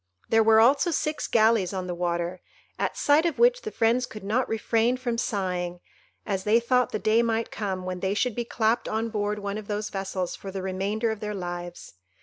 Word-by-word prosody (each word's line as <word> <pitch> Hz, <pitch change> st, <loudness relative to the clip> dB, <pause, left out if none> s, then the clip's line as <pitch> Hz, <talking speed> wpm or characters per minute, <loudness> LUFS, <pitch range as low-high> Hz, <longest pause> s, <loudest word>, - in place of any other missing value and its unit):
There 225 Hz, 0 st, +5 dB
were 220 Hz, 0 st, +6 dB
also 275 Hz, +9 st, +4 dB
six 305 Hz, -2 st, -1 dB
galleys 220 Hz, -5 st, +3 dB
on 185 Hz, -1 st, -3 dB
the 180 Hz, -, -3 dB
water, 175 Hz, +1 st, -2 dB, 0.4 s
at -, -, -1 dB
sight 295 Hz, +2 st, +4 dB
of 330 Hz, -, -3 dB
which -, -, +4 dB
the 435 Hz, -, -5 dB
friends 245 Hz, -, +1 dB
could 215 Hz, -2 st, -10 dB
not 225 Hz, +6 st, 0 dB
refrain 225 Hz, +2 st, +1 dB
from 240 Hz, -2 st, -2 dB
sighing, 180 Hz, -5 st, -2 dB, 0.5 s
as 195 Hz, -2 st, -2 dB
they 215 Hz, +3 st, +4 dB
thought 250 Hz, +1 st, +1 dB
the -, -, -1 dB
day 220 Hz, +2 st, +3 dB
might 230 Hz, -1 st, -1 dB
come 190 Hz, -4 st, -3 dB
when 185 Hz, 0 st, -4 dB
they 190 Hz, +2 st, -1 dB
should 250 Hz, +2 st, +1 dB
be 240 Hz, -, -2 dB
clapped 230 Hz, 0 st, 0 dB
on 225 Hz, +1 st, -1 dB
board 210 Hz, -1 st, -1 dB
one 200 Hz, 0 st, -4 dB
of 210 Hz, -, -11 dB
those 210 Hz, 0 st, -3 dB
vessels 190 Hz, -2 st, -3 dB
for 195 Hz, -, -8 dB
the 190 Hz, -1 st, -5 dB
remainder 200 Hz, +4 st, -1 dB
of 220 Hz, -, -5 dB
their 210 Hz, 0 st, -4 dB
lives. 175 Hz, -1 st, -6 dB
215 Hz, 210 wpm, -26 LUFS, 190-230 Hz, 0.5 s, were